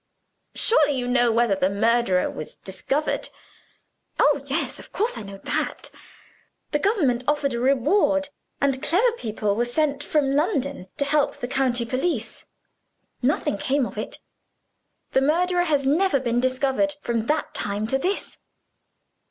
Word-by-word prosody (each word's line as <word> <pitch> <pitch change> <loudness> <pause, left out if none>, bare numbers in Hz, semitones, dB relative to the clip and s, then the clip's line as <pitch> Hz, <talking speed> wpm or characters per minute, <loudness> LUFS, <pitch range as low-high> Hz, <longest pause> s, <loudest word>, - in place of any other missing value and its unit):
"Surely 295 - +4
you 245 -1 -2
know 245 -1 +3
whether 230 -2 +2
the 190 -1 +1
murderer 215 -2 +2
was 155 - -7
discovered?" 270 +10 -2 0.9
"Oh, - - +3
yes - - -2
of - - -13
course 455 +4 0
I - - -6
know 200 -1 -9
that! - - -3 0.8
The 295 - +1
government 290 - +1
offered 290 -2 +1
a 235 - -2
reward; 285 - +2 0.3
and 270 -2 0
clever 400 +11 +2
people 215 - -2
were 235 - +1
sent 280 +3 0
from 275 -3 +1
London 280 - -1
to 280 - +2
help 290 0 +1
the 245 - -4
county 250 -2 0
police. 255 -2 -2 0.8
Nothing 250 -6 0
came 270 +3 +1
of - - -8
it. - - -5 0.9
The 265 - +3
murderer 350 +5 +2
has 290 -4 +1
never 305 +1 +3
been 240 -2 0
discovered, 265 +3 +1
from 230 -1 -1
that 305 0 -1
time 205 +1 -2
to 265 +4 +1
this." 375 +8 -2
270 Hz, 145 wpm, -24 LUFS, 235-300 Hz, 0.9 s, Surely